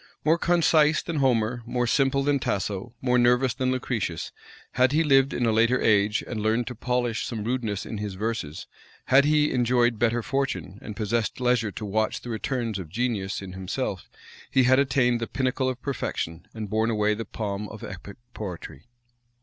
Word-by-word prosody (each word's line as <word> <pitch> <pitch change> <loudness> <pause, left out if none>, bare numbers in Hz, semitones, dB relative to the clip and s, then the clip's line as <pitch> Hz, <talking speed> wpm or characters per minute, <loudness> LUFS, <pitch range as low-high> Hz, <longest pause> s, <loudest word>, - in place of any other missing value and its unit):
More 160 +2 +4
concise 160 -3 +3
than 165 -2 -3
Homer, 120 -3 +1
more 120 +1 -1
simple 135 +2 +2
than 145 0 +2
Tasso, 100 +1 -3
more 125 -1 +2
nervous 125 +1 +3
than 130 0 0
Lucretius, 120 -9 -2 0.4
had 130 +2 +3
he 160 +2 +3
lived 135 -2 +4
in 120 - 0
a 115 - +3
later 115 +3 +3
age, 105 0 +3
and 110 -3 -4
learned 110 +3 +1
to 125 - -5
polish 120 -1 -1
some 110 -3 -4
rudeness 115 -4 -2
in 110 - -5
his 105 -2 -4
verses; 105 -7 -3 0.4
had 135 +2 +5
he 150 0 +3
enjoyed 120 -2 +2
better 120 0 +1
fortune, 105 - -2
and 105 - -7
possessed 110 +2 -1
leisure 125 -4 +1
to 110 - -6
watch 110 +2 -1
the 120 - -6
returns 115 -2 -2
of 85 -4 -7
genius 100 -2 -2
in 95 -2 -8
himself; 95 +1 -4 0.4
he 130 - +3
had 130 +2 +5
attained 130 -3 +2
the 115 - -2
pinnacle 130 0 0
of 130 -1 -4
perfection, 90 - -4
and 110 -2 -6
borne 110 +1 +1
away 105 -1 +2
the 110 +2 -4
palm 105 -1 -4
of 110 - -10
epic 100 +1 -8 0.2
poetry. 90 - -7
120 Hz, 180 wpm, -26 LUFS, 105-130 Hz, 0.4 s, had